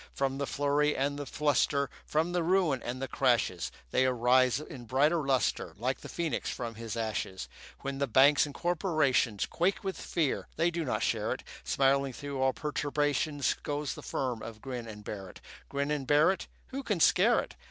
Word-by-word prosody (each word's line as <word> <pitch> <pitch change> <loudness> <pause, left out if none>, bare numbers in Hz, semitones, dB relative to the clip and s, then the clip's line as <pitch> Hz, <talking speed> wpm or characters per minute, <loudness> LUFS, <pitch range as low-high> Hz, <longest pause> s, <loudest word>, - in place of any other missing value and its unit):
From 135 0 -1
the 140 - -1
flurry 145 +1 +1
and 140 +2 0
the 145 - -5
fluster, 145 -1 +1 0.2
From 160 +3 +1
the 175 0 +1
ruin 165 -6 +2
and 125 +2 -4
the 135 - -3
crashes, 120 -9 +1 0.2
They 130 - +3
arise 125 +1 +3
in 130 -5 -9
brighter 150 +7 +2
lustre, 135 -2 0
Like 125 +5 -1
the - - -9
phoenix 170 -3 -2
from 120 -3 -4
his 115 0 -6
ashes. 110 -4 -3 0.3
When 140 0 -4
the 140 - +1
banks 140 +5 +5
and 145 - -10
corporations 155 - +1
Quake 185 +3 0
with 190 -1 -4
fear, 160 -6 -1
they 170 +1 +2
do 170 -1 -2
not 130 - -1
share - - 0
it; - - -8 0.2
Smiling 135 0 +2
through 140 +2 -5
all 130 0 +4
perturbations 145 0 0
Goes 145 -1 -2
the - - -9
firm 125 -4 -2
of 115 -1 -8
Grin 125 -1 -6
and 105 -1 -9
Barrett. 95 -3 -7 0.3
Grin 140 +1 -1
and 145 -3 -2
Barrett, 155 +7 +3 0.2
Who 270 +1 -4
can 210 -9 -1
scare - - +5
it? - - -6
140 Hz, 185 wpm, -30 LUFS, 125-150 Hz, 0.3 s, banks